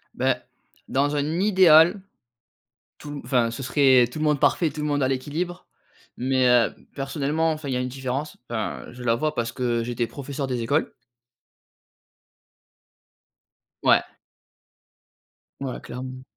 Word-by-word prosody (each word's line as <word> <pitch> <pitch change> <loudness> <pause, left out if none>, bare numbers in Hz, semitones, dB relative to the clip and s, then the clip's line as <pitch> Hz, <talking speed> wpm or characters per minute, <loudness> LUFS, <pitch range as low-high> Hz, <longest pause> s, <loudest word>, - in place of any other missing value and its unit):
Beh, - - +2 0.5
dans 145 +2 +1
un 150 +4 -1
idéal, 185 -2 +6 1.0
tout 145 -1 -8
enfin 120 -4 +2
ce 120 - -6
serait 130 -3 +4
tout 155 - -6
le 155 - 0
monde 150 -2 +2
parfait, 155 +3 +3
tout 150 0 -6
le 150 - -1
monde 145 -2 +1
a - - +3
l'équilibre. 155 +7 -3 0.5
Mais 130 0 +2
heu, 120 -2 +4 0.2
personnellement, 145 +3 -1
enfin, 155 -2 -5
il 130 - -1
y - - 0
a - - -1
une 125 - -3
différence, 135 +3 -4
enfin, 110 -3 -3
je 125 0 -10
la 115 -1 +2
vois 155 +4 -1
parce 115 0 -1
que 120 -1 -1
j'étais 120 0 -2
professeur 140 0 -5
des 125 -2 -2
écoles 140 +7 0 2.9
Ouais. - - +5 1.6
Ouais, 135 -2 -4
clairement. 130 +1 -7
135 Hz, 145 wpm, -24 LUFS, 125-150 Hz, 2.9 s, idéal